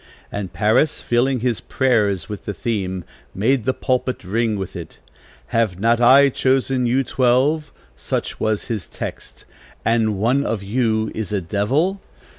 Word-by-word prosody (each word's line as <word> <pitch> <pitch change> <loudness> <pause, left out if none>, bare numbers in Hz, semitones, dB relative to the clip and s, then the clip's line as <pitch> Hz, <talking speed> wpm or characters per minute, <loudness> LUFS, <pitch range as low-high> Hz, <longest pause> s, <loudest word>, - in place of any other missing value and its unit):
And 100 -3 -4
Parris, 105 - +2
filling 125 +1 +1
his 120 -3 0
prayers 105 - +1
with 105 -2 -7
the 105 - -4
theme, 95 -3 -2 0.3
made 120 +4 +1
the 130 - +2
pulpit 130 -2 -1
ring 110 +3 0
with 95 -1 -5
it. 85 -3 -8 0.5
'Have 110 -6 0
not 115 +3 +2
I 135 +3 +7
chosen 130 -1 +1
you 130 +3 +2
twelve,' 135 +5 +1 0.2
such - - -4
was 110 -1 0
his 105 -7 -4
text, - - -8 0.4
'and 110 -3 +2
one 125 +7 +2
of 110 -6 -2
you 110 0 0
is 110 -3 -4
a 105 - +1
devil?' 135 - 0
115 Hz, 150 wpm, -21 LUFS, 100-130 Hz, 0.5 s, I